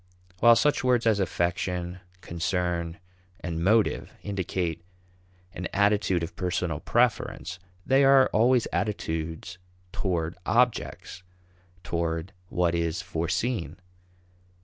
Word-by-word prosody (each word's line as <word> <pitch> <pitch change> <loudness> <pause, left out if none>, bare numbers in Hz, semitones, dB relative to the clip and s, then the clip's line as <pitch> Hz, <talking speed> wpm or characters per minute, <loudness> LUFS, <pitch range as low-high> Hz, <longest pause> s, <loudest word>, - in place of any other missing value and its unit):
While 120 +2 +7
such 150 +3 +2
words 125 -2 +2
as 110 -3 +3
affection, 90 0 -1 0.2
concern, 85 0 -2 0.4
and 85 -1 -3
motive 110 +3 +2
indicate 90 -4 -2 0.7
an 90 +2 -4
attitude 100 -3 +2
of 85 - -6
personal 90 -3 -2
preference, 120 0 0 0.3
they 135 +1 +4
are 135 -1 +7
always 120 +2 +4
attitudes 80 -3 -3 0.3
toward 85 -3 -2
objects 120 -6 0 0.6
toward 85 0 -2 0.2
what 85 -1 +1
is 85 0 -1
foreseen. 90 +9 -2
90 Hz, 100 wpm, -27 LUFS, 85-110 Hz, 0.7 s, While